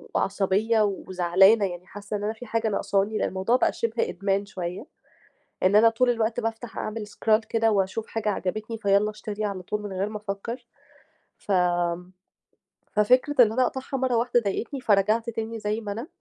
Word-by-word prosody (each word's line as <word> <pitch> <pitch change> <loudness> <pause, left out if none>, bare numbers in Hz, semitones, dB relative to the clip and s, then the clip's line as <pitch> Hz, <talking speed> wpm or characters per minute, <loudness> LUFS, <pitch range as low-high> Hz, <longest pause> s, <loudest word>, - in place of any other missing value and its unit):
وعصبيّة 200 +3 +1
وزعلانة، 190 +1 +3
يعني 180 -1 -6
حاسّة 205 +1 -5
إن 205 - -6
أنا 215 +1 -1
في 225 +2 -11
حاجة 230 0 -1
ناقصاني 205 0 0
لإن - - 0
الموضوع 190 +6 0
بقى 255 - +2
شِبه 230 0 -1
إدمان 195 0 -1
شوية 185 +2 -6 0.8
إن 190 +2 +4
أنا 225 +2 +7
طول 245 +2 +2
الوقت 230 0 0
بافتح 225 +1 -5
أعمل 215 0 -4
scroll 220 +1 +1
كده 225 0 +2
وأشوف 200 +1 0
حاجة 225 -1 -3
عجبتني 215 +3 -3
فيالّا 200 0 +2
اشتري 210 0 -5
على 200 -3 -3
طول 210 +3 -3
من 205 -1 -6
غير 190 +2 -1
ما 215 - -6
أفكّر. 210 +4 -6 0.7
فآمم 180 -2 0 0.8
ففكرة 250 +7 +3
إن 215 - +1
أنا 255 +3 +2
أقطعها 265 +2 -3
مرّة 255 -1 +1
واحدة 240 +1 +2
ضايقتني، 235 +5 -3
فرجعت 215 +1 +2
تاني 225 0 -4
زي 210 +1 -2
ما 205 -2 -5
أنا، 230 +7 -5
215 Hz, 175 wpm, -25 LUFS, 195-230 Hz, 0.8 s, أنا